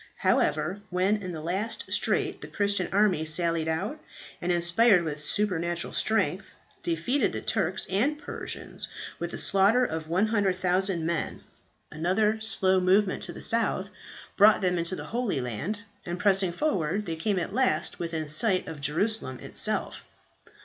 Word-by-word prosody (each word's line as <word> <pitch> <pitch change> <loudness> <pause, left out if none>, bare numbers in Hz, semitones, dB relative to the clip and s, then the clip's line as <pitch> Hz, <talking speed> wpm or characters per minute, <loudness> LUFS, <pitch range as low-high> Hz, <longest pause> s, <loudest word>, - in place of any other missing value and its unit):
However, 155 +6 +1
when 185 +3 +1
in 185 -3 -6
the 160 -3 -6
last 190 +8 -2
strait - - 0
the - - -7
Christian 200 -3 0
army 195 -5 +2
sallied 165 0 +1
out, 195 - -2 0.4
and 175 - -1
inspired 175 +3 +5
with 155 -2 -4
supernatural 170 0 0
strength, 220 0 0 0.3
defeated 290 -6 0
the - - -4
Turks 190 -3 -1
and 245 +11 0
Persians, - - -7 0.3
with - - -4
a - - -5
slaughter 205 +6 +3
of 160 -6 -4
100,000 185 -2 +1
men. 170 -1 -3 0.5
Another 210 +7 0
slow 190 -4 +2
movement 185 +2 +2
to - - -4
the - - -10
south 215 -4 -1 0.4
brought 210 +1 +6
them 180 -2 +1
into 170 +2 +1
the - - -7
Holy 235 - -1
Land, 130 - -4 0.2
and 175 0 -5
pressing 195 -2 +4
forward, 195 - -1
they 165 -3 -3
came 195 +5 -1
at 175 - -3
last 260 0 +1
within 165 -2 -3
sight 185 +5 +3
of 155 -3 -7
Jerusalem 150 - 0
itself. - - +1
185 Hz, 150 wpm, -27 LUFS, 165-210 Hz, 0.5 s, brought